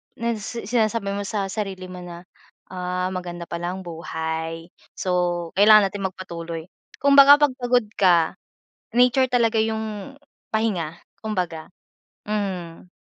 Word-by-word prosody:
na 235 Hz, -1 st, -2 dB
sinasabi 220 Hz, -1 st, -1 dB
mo 205 Hz, -, -2 dB
sa 205 Hz, -3 st, -2 dB
sarili 190 Hz, -3 st, -4 dB
mo 180 Hz, -, -8 dB
na 175 Hz, 0 st, -9 dB, 0.5 s
ah, 180 Hz, 0 st, -2 dB
maganda 175 Hz, -2 st, -5 dB
pala 175 Hz, +2 st, -4 dB
ang 190 Hz, -, -8 dB
buhay. 165 Hz, 0 st, -5 dB, 0.2 s
So 175 Hz, -2 st, -1 dB
kailangan 210 Hz, -1 st, +7 dB
natin 195 Hz, -1 st, -2 dB
magpatuloy. 170 Hz, -3 st, -7 dB, 0.4 s
Kumbaga 280 Hz, 0 st, +8 dB
pag 275 Hz, -3 st, +3 dB
pagod 245 Hz, -2 st, +2 dB
ka, 175 Hz, -4 st, +4 dB, 0.6 s
nature 250 Hz, +1 st, +4 dB
talaga 230 Hz, -2 st, +3 dB
yung 220 Hz, +1 st, -3 dB, 0.4 s
pahinga, 190 Hz, -8 st, -1 dB, 0.3 s
kumbaga. 180 Hz, -7 st, -3 dB, 0.6 s
Mm. 185 Hz, -5 st, -4 dB
190 Hz, 120 wpm, -23 LUFS, 175-220 Hz, 0.6 s, Kumbaga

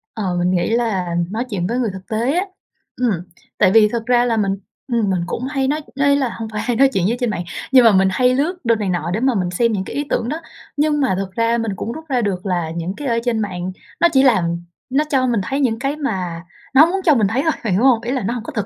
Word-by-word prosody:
Ờ, 195 Hz, -5 st, -2 dB
mình 180 Hz, +1 st, +1 dB
nghĩ 175 Hz, -2 st, +1 dB
là 210 Hz, -7 st, 0 dB, 0.2 s
nói 230 Hz, +3 st, -2 dB
chuyện 180 Hz, -4 st, -2 dB
với 235 Hz, +4 st, -1 dB
người 240 Hz, -3 st, 0 dB
thực 190 Hz, 0 st, -10 dB
tế 230 Hz, +5 st, 0 dB
á. 380 Hz, -, -1 dB, 0.5 s
Ừm, 245 Hz, -2 st, +1 dB, 0.5 s
tại 190 Hz, -3 st, +4 dB
vì 215 Hz, 0 st, +6 dB
thật 230 Hz, -1 st, -3 dB
ra 245 Hz, 0 st, +3 dB
là 230 Hz, -2 st, +1 dB
mình, 200 Hz, -2 st, +1 dB, 0.4 s
ừm, 225 Hz, -4 st, +1 dB
mình 185 Hz, -2 st, +1 dB
cũng 235 Hz, -, -4 dB
hay 270 Hz, -2 st, -1 dB
nói 300 Hz, +3 st, 0 dB
nói 280 Hz, +1 st, +3 dB
là 270 Hz, -3 st, 0 dB
hông 225 Hz, -, -4 dB
phải 210 Hz, -1 st, -3 dB
hay 240 Hz, +2 st, -1 dB
nói 275 Hz, +3 st, +5 dB
chuyện 190 Hz, -3 st, +1 dB
với 235 Hz, +3 st, 0 dB
trên 245 Hz, -2 st, 0 dB
mạng, 175 Hz, -4 st, -3 dB, 0.3 s
nhưng 255 Hz, -2 st, +7 dB
mà 225 Hz, -, +8 dB
mình 190 Hz, -1 st, +4 dB
hay 250 Hz, +6 st, +3 dB
lướt 315 Hz, +7 st, 0 dB
đồ 230 Hz, 0 st, +4 dB
này 210 Hz, -3 st, -2 dB
nọ 175 Hz, -1 st, -1 dB
để 210 Hz, -, 0 dB
mà 260 Hz, +1 st, +2 dB
mình 180 Hz, -3 st, 0 dB
xem 230 Hz, +6 st, +1 dB
những 200 Hz, -3 st, -1 dB
cái -, -, -7 dB
ý 290 Hz, -, 0 dB
tưởng 235 Hz, 0 st, -1 dB
đó. 310 Hz, -, -3 dB, 0.4 s
Nhưng 295 Hz, 0 st, +2 dB
mà 260 Hz, -8 st, +2 dB
thực 195 Hz, -1 st, -4 dB
ra 230 Hz, +3 st, +1 dB
mình 225 Hz, -2 st, -2 dB
cũng 225 Hz, -, -4 dB
rút 315 Hz, +6 st, -8 dB
ra 255 Hz, -3 st, +1 dB
được 195 Hz, -3 st, -2 dB
là 175 Hz, -4 st, -1 dB
những 170 Hz, +3 st, -3 dB
cái 290 Hz, -, -5 dB
ở 230 Hz, -2 st, +1 dB
trên 235 Hz, -2 st, 0 dB
mạng 185 Hz, -3 st, -3 dB, 0.3 s
nó 340 Hz, -, +6 dB
chỉ 265 Hz, -2 st, +4 dB
làm 175 Hz, -9 st, +2 dB, 0.3 s
nó 275 Hz, +4 st, +2 dB
cho 265 Hz, -4 st, +2 dB
mình 235 Hz, -4 st, +1 dB
thấy 270 Hz, +8 st, -2 dB
những 235 Hz, -5 st, +1 dB
cái 275 Hz, +3 st, -1 dB
mà 185 Hz, -, -3 dB, 0.3 s
nó 295 Hz, +4 st, +9 dB
muốn 380 Hz, +3 st, -1 dB
cho 310 Hz, -4 st, +5 dB
mình 215 Hz, -5 st, +3 dB
thấy 230 Hz, +6 st, 0 dB
thôi, 320 Hz, -, +2 dB
bạn 210 Hz, -5 st, 0 dB
hiểu 200 Hz, -, +2 dB
hông? 250 Hz, -4 st, +4 dB
Ý 240 Hz, +1 st, -3 dB
là 260 Hz, -5 st, -1 dB
nó 230 Hz, -, -1 dB
hông 240 Hz, -3 st, -5 dB
có -, -, -8 dB
thực, 210 Hz, -3 st, -1 dB
230 Hz, 290 wpm, -19 LUFS, 190-260 Hz, 0.5 s, nó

